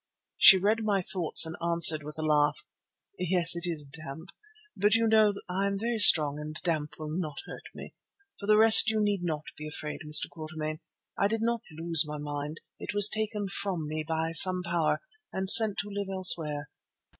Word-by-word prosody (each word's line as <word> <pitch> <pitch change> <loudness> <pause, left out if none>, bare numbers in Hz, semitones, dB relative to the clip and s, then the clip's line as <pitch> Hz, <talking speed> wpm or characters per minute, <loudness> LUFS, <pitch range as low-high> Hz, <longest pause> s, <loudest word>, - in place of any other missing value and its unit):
She 190 - +7
read 215 +4 -2
my 205 -2 -2
thoughts 175 -3 +3
and 160 - -7
answered 170 -2 +3
with 150 +1 -11
a 155 - -5
laugh: 150 -1 -1 0.5
"Yes, 180 -1 -2
it 170 +1 0
is 155 -4 -5
damp; 155 +4 -12 0.5
but 210 +1 0
you 225 0 0
know 215 -2 +1
I 190 +2 -4
am 200 0 -4
very 230 +2 -5
strong 150 -7 +6
and 155 +1 -10
damp 150 -3 -5
will 155 -1 -9
not 155 -5 -7
hurt - - -13
me. - - -12 0.5
For 200 - -10
the 210 0 +2
rest 220 +1 +7
you 220 0 -3
need 205 -3 -2
not 155 -3 -5
be 155 - -10
afraid, 150 0 -8
Mr. 150 0 +1
Quatermain. 155 -1 -9 0.4
I 200 - +1
did 225 +1 -4
not 235 0 -3
lose 165 +1 +2
my 150 0 -8
mind. 145 +1 -8 0.2
It - - -8
was 205 0 +5
taken 215 -1 -5
from 190 -5 -6
me 155 +1 -6
by 160 +1 -5
some 180 +2 +6
power 170 -2 -3 0.3
and 190 0 -6
sent 220 -3 +6
to 205 - -12
live 200 -1 -7
elsewhere. 160 -6 +1
170 Hz, 190 wpm, -26 LUFS, 155-200 Hz, 0.5 s, She